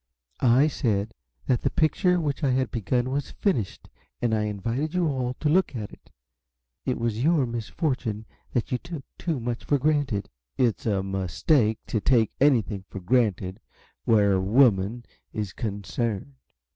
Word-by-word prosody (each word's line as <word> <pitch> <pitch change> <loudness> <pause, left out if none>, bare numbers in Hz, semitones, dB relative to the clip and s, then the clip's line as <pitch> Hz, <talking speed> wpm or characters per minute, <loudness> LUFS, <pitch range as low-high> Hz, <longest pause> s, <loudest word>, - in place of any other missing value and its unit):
"I 125 +3 +5
said 115 -8 0 0.3
that 125 -3 +1
the - - +1
picture 180 +3 +2
which 145 -4 -2
I 140 - +3
had 130 -1 +1
begun 120 +3 0
was 140 +1 -2
finished, 125 - -1 0.3
and 120 -2 0
I 105 -1 +1
invited 115 - -2
you 180 -2 +2
all 130 -3 -1
to 155 - -2
look 170 -2 +2
at 105 -3 -5
it. - - -17 0.8
It 130 - +1
was 115 0 -1
your 155 -3 +3
misfortune 115 -1 -2 0.3
that 120 - -1
you 125 - 0
took 170 -5 -7 0.2
too 165 -6 -1
much 120 0 -3
for 145 - +2
granted." 140 -8 0 0.3
"It's 120 -3 +1
a 100 -3 +1
mistake 95 - +1
to 110 - -1
take 115 -3 +3
anything 115 -8 +3
for 100 - -6
granted 95 -2 +1 0.5
where 105 -3 +4
a 95 - +2
woman 110 +1 +3 0.3
is 105 -3 -3
concerned. 110 +2 -3
120 Hz, 160 wpm, -26 LUFS, 105-140 Hz, 0.8 s, I